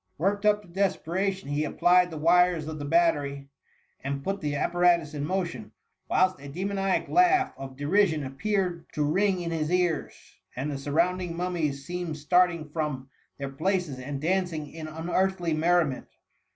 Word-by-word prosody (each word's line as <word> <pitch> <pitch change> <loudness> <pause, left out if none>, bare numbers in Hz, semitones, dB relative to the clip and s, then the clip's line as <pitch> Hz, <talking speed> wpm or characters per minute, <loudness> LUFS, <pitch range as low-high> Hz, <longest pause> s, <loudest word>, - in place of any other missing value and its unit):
Worked 200 +5 +1
up 210 0 +3
to - - -17
desperation, 190 0 -1
he 145 +1 0
applied 180 +3 +3
the 160 - -7
wires 170 0 +3
of 155 -1 -5
the 145 - -4
battery 145 -4 +1 0.5
and 140 0 -3
put 195 +3 -2
the 150 -2 -2
appiu*atu8 170 0 +2
in 145 -1 -3
motion, 155 - -3 0.4
whilst 185 0 +2
a 140 - -9
d^sioniac 195 +4 -1
laugh 365 +2 +3
of 135 -1 -9
derision 160 +1 +2
appeared 180 +4 -2
to 150 - 0
ring 185 +5 +1
in 170 -1 -3
his 155 -2 -1
ears, 180 -3 -1 0.2
and 140 +4 -3
the - - -3
jsucrounding 170 +5 0
mummies 165 -6 -2
seemed 175 -2 -4
starting 170 +1 +2
from 150 -2 -1
wf^mam^^^^^^ 130 - -6
J - - -33 0.3
their 140 -1 -4
places 160 -1 -1
and 135 +2 -5
dandng 165 -3 -1
ia 155 -1 -7
unearthly 175 +1 0
merri* 170 +2 +3
ment. 135 -3 -6
170 Hz, 165 wpm, -27 LUFS, 150-185 Hz, 0.5 s, up